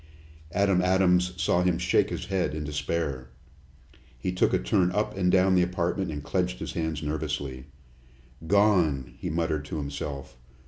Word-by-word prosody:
Adam 95 0 +2
Adams 90 -1 +3
saw 90 - +2
him 90 -2 +2
shake - - +2
his - - -4
head 90 -5 -1
in 75 - -3
despair. 75 -3 -3 0.9
He 75 +9 -2
took 90 - +2
a - - +3
turn 90 +9 +1
up 105 0 -1
and 90 -2 +2
down 95 0 +4
the 90 - +4
apartment 90 +1 -1
and 75 -2 -5
clenched 90 +2 -1
his - - -6
hands 80 -2 -2
nervously. 75 -4 -3 0.8
"Gone!" 85 - +3
he - - -3
muttered 80 -2 -1
to 80 +2 -5
himself. 70 -2 -5
85 Hz, 155 wpm, -27 LUFS, 75-90 Hz, 0.9 s, down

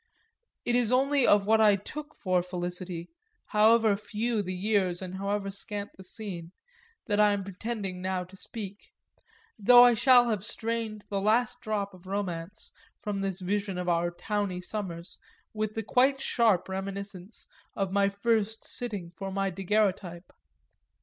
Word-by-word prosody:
It 240 - +2
is 245 -2 +2
only 270 +1 +3
of 205 -1 +5
what 220 +1 +4
I 210 -2 +6
took 295 +9 -8
for 185 -3 +1
felicity, 180 - -5 0.3
however 220 0 +4
few 215 +2 -2
the 185 -1 -4
years 190 -2 +1
and 185 -1 -6
however 200 0 -2
scant 205 +1 -5
the 190 - -12
scene, 185 -3 -6 0.5
that 205 -3 0
I 210 -1 +5
am 200 -1 -2
pretending 195 -1 -5
now 185 0 -1
to 185 +2 -14
speak; 200 0 -8 0.7
though 245 +4 +8
I 245 -1 +7
shall 245 +1 +6
have 205 -3 -2
strained 225 -1 -3
the 200 -1 0
last 220 +3 +2
drop 205 -2 -2
of 185 0 -15
romance 190 -1 -4 0.3
from 205 -2 -2
this 195 -1 -2
vision 200 0 -1
of 180 0 -3
our 175 0 +2
towny 200 +1 -2
summers 180 -3 -6 0.3
with 215 0 -2
the 225 - -2
quite 265 +5 +3
sharp 225 -8 +2
reminiscence 195 +1 -6 0.3
of 195 -2 -1
my 200 0 +3
first 220 +1 0
sitting 205 -8 -5
for 195 +3 -6
my 195 0 -1
daguerreotype. 190 -2 -1
200 Hz, 155 wpm, -28 LUFS, 185-220 Hz, 0.7 s, though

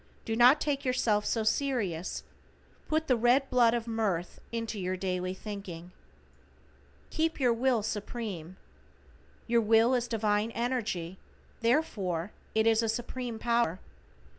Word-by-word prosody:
Do 225 - -1
not 250 +5 +7
take 285 -2 -1
yourself 230 -5 +1
so 225 - 0
serious, 215 - -1 0.6
put 315 +1 +1
the 255 - +3
red 245 +4 +3
blood 240 -2 +4
of 235 -1 -2
mirth 210 -7 -2
into 230 -2 -3
your 185 0 -2
daily 185 0 -2
thinking. 185 -4 -8 1.2
=KEEP 320 0 0
YOUR 250 -3 +3
WILL 240 -2 +1
SUPREME:= 205 -5 -5 0.9
Your 235 0 +3
will 225 +3 +4
is 245 -1 +1
divine 215 -1 +1
energy, 215 -8 -2 0.4
therefore 210 - 0 0.2
it 220 0 +3
is 225 0 +4
a 225 - -1
Supreme 240 0 -3
Power. 235 -6 +1
225 Hz, 130 wpm, -30 LUFS, 200-245 Hz, 1.2 s, not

